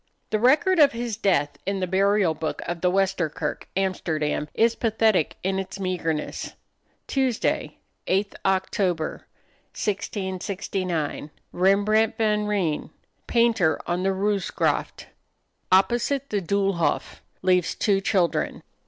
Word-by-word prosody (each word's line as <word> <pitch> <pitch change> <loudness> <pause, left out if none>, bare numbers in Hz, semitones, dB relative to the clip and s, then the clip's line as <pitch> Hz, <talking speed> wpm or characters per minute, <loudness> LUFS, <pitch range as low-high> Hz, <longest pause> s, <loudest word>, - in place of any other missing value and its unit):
The 215 - +1
record 315 - +4
of 285 -4 +6
his 235 -1 -3
death 185 -9 +1
in 195 0 -2
the 185 - 0
Burial 195 -1 +2
Book 155 0 -4
of 175 -1 -4
the 180 - +3
Wester 190 -3 +1
Kirk, 150 0 -4
Amsterdam, 160 -6 -1
is 230 0 +4
pathetic 220 -7 +1
in 190 +1 0
its 190 +1 -6
meagerness. 170 -5 -3 0.5
"Tuesday, 260 -4 -1 0.3
8th 195 +2 +1
Oct., 190 +2 0
1669. 185 -1 -4 0.2
Rembrandt 205 +4 +3
van 210 -1 +1
Rijn, 185 -9 -1 0.4
painter 225 -10 +3
on 175 +1 -1
the 190 - +1
Roozegraft, 195 +1 -1 0.7
opposite 240 +8 +2
the 205 -2 0
Doolhof. 195 -2 0 0.2
Leaves 180 -2 +2
two 195 -2 +2
children." 185 -4 0
195 Hz, 115 wpm, -24 LUFS, 180-210 Hz, 0.7 s, of